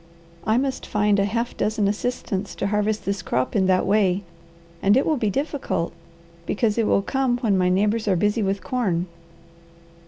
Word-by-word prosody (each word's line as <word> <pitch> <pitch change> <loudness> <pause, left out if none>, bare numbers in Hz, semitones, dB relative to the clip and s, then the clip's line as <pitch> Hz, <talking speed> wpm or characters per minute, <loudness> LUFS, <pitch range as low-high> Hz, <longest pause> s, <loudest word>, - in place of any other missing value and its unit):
I 220 +1 +2
must 265 0 -2
find 210 -1 +2
a 200 - +3
half 230 +3 -2
dozen 215 -1 0
assistants 205 -2 -2
to - - -3
harvest 210 +1 0
this 200 -1 -1
crop 130 -4 -1
in 190 -2 +3
that 185 -1 +3
way, 200 -1 +2 0.6
and 200 +4 +4
it 265 - +2
will 315 - +2
be 225 -6 0
difficult, 275 - -2 0.5
because 215 +1 +1
it 220 - +2
will 195 - +2
come 265 +1 0
when 225 -5 +1
my 180 -1 +2
neighbours 210 +4 +1
are 195 - +3
busy 210 +5 +1
with 195 -1 -1
corn." 195 -10 0
210 Hz, 180 wpm, -23 LUFS, 195-230 Hz, 0.6 s, and